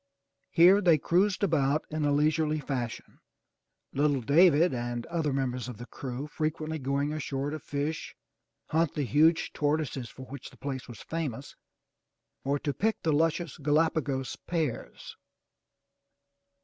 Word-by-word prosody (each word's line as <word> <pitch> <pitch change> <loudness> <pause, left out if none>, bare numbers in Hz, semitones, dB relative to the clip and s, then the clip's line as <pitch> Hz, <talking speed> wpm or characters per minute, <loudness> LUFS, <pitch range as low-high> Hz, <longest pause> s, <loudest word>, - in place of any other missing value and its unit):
Here 180 +4 +6
they 170 -5 +5
cruised 185 +7 +1
about 150 -4 +2
in 155 -1 -1
a 145 - +2
leisurely 155 +1 +2
fashion, 130 -5 -5 0.7
little 140 -1 +2
David 160 +4 +5
and 120 -1 -3
other 165 -3 -1
mem 135 -2 0
bers 125 -1 -5
of 120 - -8
the 120 - -8
crew 130 +2 -6
frequently 155 +1 -3
going 140 +2 -1
ashore 140 -2 -3
to 155 - -4
fish, 145 +2 -4 0.5
hunt 160 -1 +1
the 150 - 0
huge 155 +7 +3
tortoises 145 -4 -1
for 130 - -10
which 135 0 -9
the - - -19
place 135 -2 -5
was 120 - -10
famous, 145 -6 -4 0.9
or 140 +1 +1
to 145 0 -2
pick 220 +7 0
the 160 - +2
luscious 165 +1 0
Galapagos 145 -3 +1
pears. 160 -8 -3
150 Hz, 140 wpm, -29 LUFS, 135-160 Hz, 0.9 s, Here